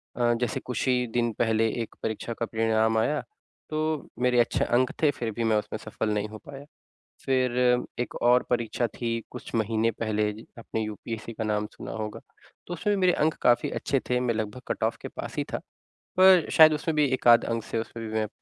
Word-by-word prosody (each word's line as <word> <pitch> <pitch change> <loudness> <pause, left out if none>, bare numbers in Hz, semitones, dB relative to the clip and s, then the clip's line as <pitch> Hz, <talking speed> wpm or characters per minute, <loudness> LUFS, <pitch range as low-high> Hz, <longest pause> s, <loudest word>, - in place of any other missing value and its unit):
अ, 120 -1 +2
जैसे 120 - -1
कुछ 125 +1 -3
ही 125 -1 +2
दिन 120 -1 +1
पहले 115 -1 +2
1 115 - -6
परीक्षा 110 +1 -3
का 115 - -3
परिणाम 110 0 +1
आया 145 +6 +1 0.5
तो 155 -1 -2
मेरे 125 -1 +3
अच्छे 120 - +2
अंक 125 +2 +2
थे 155 - +5
फ़िर 115 -4 -4
भी 115 +2 -3
मैं 110 -1 +3
उसमें 105 - -3
सफल 110 - -3
नहीं 105 0 -1
हो 110 - -8
पाया। 140 0 -10 0.6
फ़िर 130 -2 +1 0.4
1 120 - -3
और 125 +1 +5
परीक्षा 120 0 0
थी 115 +1 -3
कुछ - - -9
महीने 115 +1 +1
पहले 105 -1 -1
ज 110 - -12
आपने 110 -1 -4
यूपीएससी 110 +1 -5
का 110 - -4
नाम 105 0 0
सुना - - -8
होगा। 110 -1 -5 0.5
तो 175 - -4
उसमें 205 +4 0
भी - - -2
मेरे 180 -1 +4
अंक 155 +1 +2
काफ़ी 120 -1 +3
अच्छे 135 - -1
थे। 125 0 +2
मैं 125 -2 0
लगभग 110 +3 -4
कट - - -2
ऑफ - - +1
के - - -5
पास - - -7
ही - - +1
था - - +1 0.6
पर 185 -3 +7
शायद 155 -1 +8
उसमें 155 +1 -2
भी 150 -1 +4
1 130 - -1
आध 120 0 +8
अंक 115 -1 -2
से - - -4
उसमें 115 0 -6
भी 110 - -7
मैं 110 -1 0
115 Hz, 215 wpm, -27 LUFS, 110-125 Hz, 0.6 s, शायद